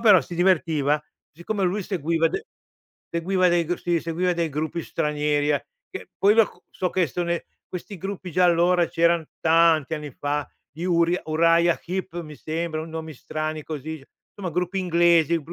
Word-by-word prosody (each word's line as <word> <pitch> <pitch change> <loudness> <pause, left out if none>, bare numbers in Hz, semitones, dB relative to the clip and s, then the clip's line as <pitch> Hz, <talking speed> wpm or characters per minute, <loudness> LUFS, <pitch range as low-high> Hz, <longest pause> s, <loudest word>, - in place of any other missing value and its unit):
però 210 -6 +7
si 175 - -8
divertiva, 155 -5 +2 0.3
siccome 190 +4 -2
lui 195 +3 0
seguiva 165 -3 0
de - - -4 0.7
seguiva 180 +2 +2
dei 170 -1 +2
gru 175 +2 -1
sì 175 -1 0
seguiva 175 +2 0
dei 170 -1 0
gruppi 155 +3 -3
stranieri 150 -1 0
eh 145 -3 0 0.2
che - - -8
poi 205 +2 +5
lo 225 -2 +6
c - - -16
so 180 -1 -2
che 180 -3 +2
son 170 +5 -3
e 170 - -2 0.2
questi 185 +2 -7
gruppi 190 -2 -6
già 185 - +2
allora 175 0 +4
c'eran 170 0 +2 0.2
tanti 160 -2 +4
anni 150 -1 -6
fa, 145 +2 -3 0.2
gli 160 +4 -9
Uriah 170 0 +2
Uraia 170 +2 +3
Heep 180 -1 -4
mi 155 -2 -10
sembra, 160 +1 -3
con 160 +1 -7
nomi 160 -1 -6
strani 155 +3 -4
così, 155 +1 -5 0.4
insomma 190 -3 -5
gruppi 180 +3 -1
inglesi, 170 -2 +3
170 Hz, 175 wpm, -24 LUFS, 155-180 Hz, 0.7 s, però